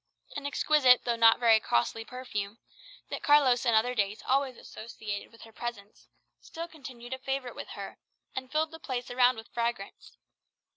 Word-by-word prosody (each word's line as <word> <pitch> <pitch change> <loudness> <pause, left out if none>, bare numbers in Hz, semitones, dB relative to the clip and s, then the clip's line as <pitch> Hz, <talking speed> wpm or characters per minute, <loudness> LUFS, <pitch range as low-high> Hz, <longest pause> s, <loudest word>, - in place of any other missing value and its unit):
An 285 0 -3
exquisite 280 -3 +4
though 240 -1 +1
not 230 -1 +6
very 230 -2 +6
costly 215 - 0
perfume, 225 -4 -5 0.5
that - - -3
Carlos 270 -4 +4
in 230 - +4
other 235 +3 +3
days 205 -2 -1
always 265 -1 +1
associated 215 -2 -7
with 230 -1 -17
her 225 - -13
presence, 220 -3 -7 0.3
still 335 +1 -7
continued 260 -6 -9
a 260 - -5
favourite 270 -1 -3
with - - -7
her, - - -8 0.4
and 260 0 -5
filled 310 +1 0
the 325 - -10
place 250 -5 -4
around 250 0 +4
with 225 0 -10
fragrance. 235 -4 -4
245 Hz, 165 wpm, -29 LUFS, 225-265 Hz, 0.5 s, not